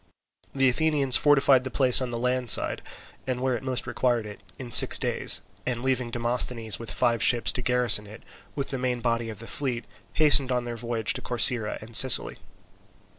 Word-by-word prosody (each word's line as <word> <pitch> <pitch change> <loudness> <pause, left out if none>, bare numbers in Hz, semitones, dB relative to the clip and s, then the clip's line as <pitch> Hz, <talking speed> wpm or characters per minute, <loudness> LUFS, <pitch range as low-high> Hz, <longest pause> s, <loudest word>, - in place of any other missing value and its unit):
The 135 -1 +1
Athenians 140 -1 +1
fortified 135 -3 +2
the 130 - -7
place 130 -1 +3
on 130 - -5
the 120 - -6
land 125 0 -3
side, - - +2 0.5
and 130 -1 -4
where 130 0 -3
it 115 - -7
most 130 -1 -3
required 120 -1 -3
it, 105 -1 -12 0.2
in 125 -2 -10
six - - +7
days, - - +1 0.2
and 120 -1 -5
leaving 130 -2 -3
Demosthenes 120 -1 -3
with 115 - -9
five 120 -3 -2
ships 120 0 +2
to 125 - -6
garrison 125 -4 +1
it, 110 +2 -15 0.3
with 140 - -6
the 135 - -6
main 125 -1 -4
body 115 -1 -3
of 110 - -10
the 115 - -12
fleet 125 -2 -5 0.3
hastened 145 -4 +3
on 125 -1 -3
their 120 -1 -7
voyage 115 -2 -4
to - - -7
Corcyra 120 -2 +2
and 115 +1 -5
Sicily. 130 +1 +5
125 Hz, 190 wpm, -23 LUFS, 115-130 Hz, 0.5 s, six